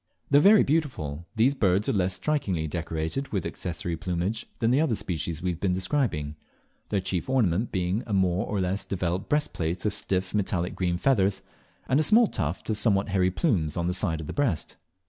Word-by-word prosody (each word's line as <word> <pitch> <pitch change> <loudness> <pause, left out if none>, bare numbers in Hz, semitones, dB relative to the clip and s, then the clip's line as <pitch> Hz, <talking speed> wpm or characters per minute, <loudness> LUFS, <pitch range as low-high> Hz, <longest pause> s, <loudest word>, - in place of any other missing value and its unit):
Though 145 - +7
very 200 +6 +7
beautiful, 85 - -1
these 120 +5 +4
birds 100 -5 +2
are - - +1
less 95 -2 +1
strikingly 95 - -1
decorated 80 - -3
with 95 -5 -3
accessory 85 -1 -3
plumage 90 +6 -2
than 115 +1 +1
the 135 +4 +4
other 145 -8 +1
species 85 -3 -4
we 90 - +1
have 85 - -6
been 95 -2 +1
describing, 90 - -1 0.5
their 100 - +1
chief 95 +3 -3
ornament 115 -5 +1
being 95 +3 0
a - - -5
more 95 -1 +1
or 105 - -1
less 95 +2 -1
developed 90 -1 -2
breastplate 90 - -1
of 105 - +1
stiff 95 -2 -2
metallic 95 -4 0
green 90 -2 -1
feathers, 100 -4 +2 0.4
and 135 - +3
a - - +4
small 225 +8 +5
tuft 80 - -3
of 105 - 0
somewhat 100 -3 +2
hairy 95 -1 +2
plumes 90 - 0
on 85 - 0
the 90 - 0
sides 85 -4 0
of - - -7
the - - -5
breast. 125 - -1
95 Hz, 195 wpm, -27 LUFS, 85-115 Hz, 0.5 s, Though